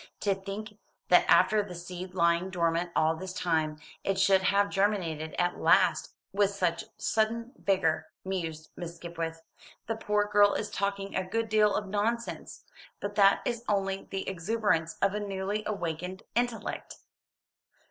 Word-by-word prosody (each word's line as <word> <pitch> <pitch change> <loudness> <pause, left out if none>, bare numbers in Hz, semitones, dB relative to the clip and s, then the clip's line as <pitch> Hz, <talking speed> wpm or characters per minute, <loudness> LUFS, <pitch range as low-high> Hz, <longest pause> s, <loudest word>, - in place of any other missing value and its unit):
"To 200 - +2
think 195 +3 -7 0.3
that - - +5
after 215 -1 +5
the 195 -3 -7
seed 180 +1 -7
lying 170 +1 +2
dormant 170 -1 0
all 160 +1 +3
this 185 +2 -6
time, 160 -5 0 0.3
it 195 -1 0
should 195 -1 +5
have 200 +2 +2
germinated 175 -6 0
at 175 0 0
last - - +3 0.2
with 200 0 +3
such 190 0 -1
sudden 230 +2 0
vigour," 185 -5 +1 0.2
mused 165 -5 -4
Miss 170 -1 -6
Skipwith. 165 -1 -5 0.4
"The 225 - -2
poor 210 -1 +1
girl 205 -1 +4
is 210 - -3
talking 200 0 -2
a 190 - +1
good 225 +4 -2
deal 210 -1 +4
of 205 - -2
nonsense; 225 +4 -2 0.4
but 205 0 -4
that 200 -1 +5
is 235 -1 -2
only 195 -1 0
the 195 0 -4
exuberance 185 -3 0
of 195 0 +3
a 210 - -1
newly 200 +1 -2
awakened 180 -1 -4
intellect." 240 -1 -2
195 Hz, 150 wpm, -29 LUFS, 175-205 Hz, 0.4 s, that